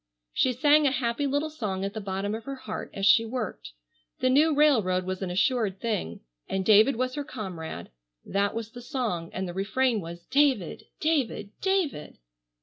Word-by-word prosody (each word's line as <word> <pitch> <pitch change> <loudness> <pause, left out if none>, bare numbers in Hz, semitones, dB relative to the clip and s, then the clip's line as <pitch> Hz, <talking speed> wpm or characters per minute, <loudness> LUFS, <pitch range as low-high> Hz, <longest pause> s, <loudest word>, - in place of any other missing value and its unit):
She 260 - +2
sang 290 +4 +4
a - - +3
happy 255 +2 -1
little 290 +3 -1
song 195 -10 -3
at 200 - -4
the 220 - -5
bottom 195 +1 -3
of 220 +1 -5
her 275 0 -4
heart 215 -5 -6
as 195 - -3
she 225 +3 +6
worked. 220 - -5 0.4
The 255 - +2
new 305 +4 +5
railroad 235 -12 +3
was 185 +1 -4
an 190 - -2
assured 200 +1 +1
thing, 150 - -3 0.3
and 190 -1 -1
David 220 +5 +6
was 255 +2 -1
her 290 - -3
comrade, 180 - -7 0.3
that 200 +1 0
was 225 -1 -4
the 245 - -10
song, 235 - -3
and 185 0 -3
the 175 - -6
refrain 215 +4 +1
was, 170 0 -9
"David, 270 - +1
David, 270 -10 0
David!" 380 - -1
225 Hz, 180 wpm, -27 LUFS, 190-270 Hz, 0.4 s, she